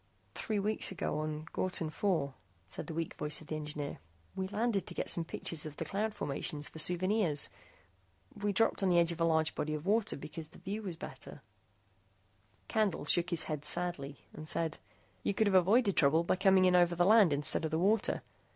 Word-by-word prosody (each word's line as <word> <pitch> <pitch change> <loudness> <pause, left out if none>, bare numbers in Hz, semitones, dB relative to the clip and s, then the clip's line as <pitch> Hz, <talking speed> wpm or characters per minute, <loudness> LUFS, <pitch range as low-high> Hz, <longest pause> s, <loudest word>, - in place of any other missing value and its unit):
"Three 215 -2 -3
weeks 210 +1 0
ago 160 -4 -3
on 155 0 -4
Ghortin 180 -4 -2
IV," 160 -4 -1 0.4
said - - -8
the 165 - -6
weak 165 -1 -3
voice 150 0 +1
of 155 - -13
the 155 - -5
engineer. 150 -1 -5 0.4
"We 190 0 -3
landed 210 -1 -1
to - - -8
get - - 0
some 170 - +2
pictures 160 -1 -4
of 150 - -11
the - - -4
cloud 210 +2 -2
formations 145 -1 -3
for 160 - -9
souvenirs. 180 -1 +5 0.9
We 205 0 -1
dropped 225 +2 +1
on 195 - +2
the 175 - +3
edge 170 0 +4
of 170 0 -6
a - - +4
large 160 -1 +1
body 155 0 -3
of 150 +2 -7
water 215 +2 +1
because 155 +2 -8
the - - -17
view 205 +3 -5
was 185 -5 -6
better - - -10 0.6
" 95 0 -38
Candle 215 -9 0
shook 175 +4 +2
his 170 -3 +1
head 150 -2 -5
sadly 160 -6 -3
and 155 - -9
said, 160 0 -1 0.4
"You 200 - -2
could 220 - +2
have 200 - +1
avoided 200 +3 +4
trouble 155 +3 +4
by 170 - +1
coming 190 0 +4
in 180 -1 +4
over 175 -1 +4
the 175 +1 +2
land 210 -4 +6
instead 145 +3 +4
of 160 - -1
the 160 - -1
water. 205 +6 +1
170 Hz, 205 wpm, -32 LUFS, 155-195 Hz, 0.9 s, land